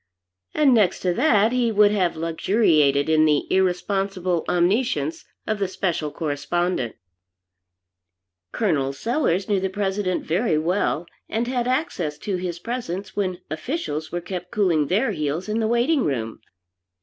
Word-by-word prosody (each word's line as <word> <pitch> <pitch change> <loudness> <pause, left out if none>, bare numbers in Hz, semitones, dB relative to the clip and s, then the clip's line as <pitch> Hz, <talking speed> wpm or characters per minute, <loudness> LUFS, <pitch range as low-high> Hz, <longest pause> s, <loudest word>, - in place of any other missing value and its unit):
And 285 -4 +5
next 210 -6 +3
to 180 -1 +1
that 215 - +3
he 245 -2 +1
would 210 -1 +5
have 185 -5 +1
luxuriated 160 -4 +2
in 155 0 +4
the 150 -2 +2
irresponsible 185 -1 0
omniscience 175 - +1 0.2
of 215 -1 -1
the 195 - 0
Special 175 -4 -2
Correspondent. 150 -2 -2 1.6
Col. 145 -11 0
Sellers 200 - 0
knew 205 -2 +2
the 190 0 -1
President 195 -1 -1
very 175 0 +1
well, 170 +1 0 0.2
and 225 +3 -1
had 250 -1 -1
access 220 - -1
to 195 +3 -3
his 180 -1 -4
presence 195 -3 -5
when 185 -3 -2
officials 155 - -3
were 175 - -3
kept 180 0 -6
cooling 175 -8 +1
their 220 - +1
heels 155 +1 -2
in 215 +1 -1
the 220 - +1
Waiting 240 +5 +2
room. 115 -5 -2
185 Hz, 140 wpm, -23 LUFS, 160-215 Hz, 1.6 s, And